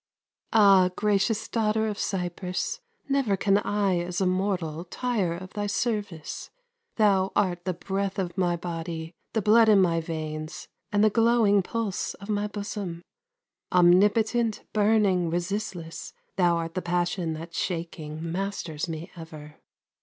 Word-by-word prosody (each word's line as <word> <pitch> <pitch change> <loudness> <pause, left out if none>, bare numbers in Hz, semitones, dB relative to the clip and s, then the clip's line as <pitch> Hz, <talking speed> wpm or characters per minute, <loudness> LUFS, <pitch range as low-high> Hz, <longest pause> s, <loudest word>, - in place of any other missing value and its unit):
Ah, 195 -4 +6
gracious 210 +1 +1
Daughter 220 -1 +1
of 210 -2 -3
Cyprus, 180 - -2 0.3
Never 270 -8 +1
can 195 +1 +3
I 200 -4 +1
as 175 0 -3
a 190 - +2
mortal 180 -4 -1
Tire 200 -4 -1
of 185 +2 -9
thy 205 -1 -2
service. 205 -6 -3 0.5
Thou 195 -3 +3
art 180 -3 +1
the 185 - -1
breath 195 +1 -2
of 180 -3 -2
my 180 -2 +1
body, 165 -1 -5 0.2
The 220 - 0
blood 220 +2 +6
in 205 -2 +7
my 170 -3 +3
veins, 155 -1 -5 0.2
and 205 0 +3
the 215 - +5
glowing 225 -3 +4
Pulse 215 0 -3
of 200 +2 -12
my 210 0 0
bosom. 200 -4 -5 0.7
Omnipotent, 210 +6 +4
burning, 205 -5 +3
resistless, 175 -1 -4 0.2
Thou 175 -2 +3
art 165 0 -4
the 185 - -2
passion 175 -1 -1
that 165 +2 -8
shaking 165 -3 -4
Masters 175 -4 -3
me 160 +2 -6
ever. 155 -3 -10
190 Hz, 140 wpm, -26 LUFS, 170-210 Hz, 0.7 s, in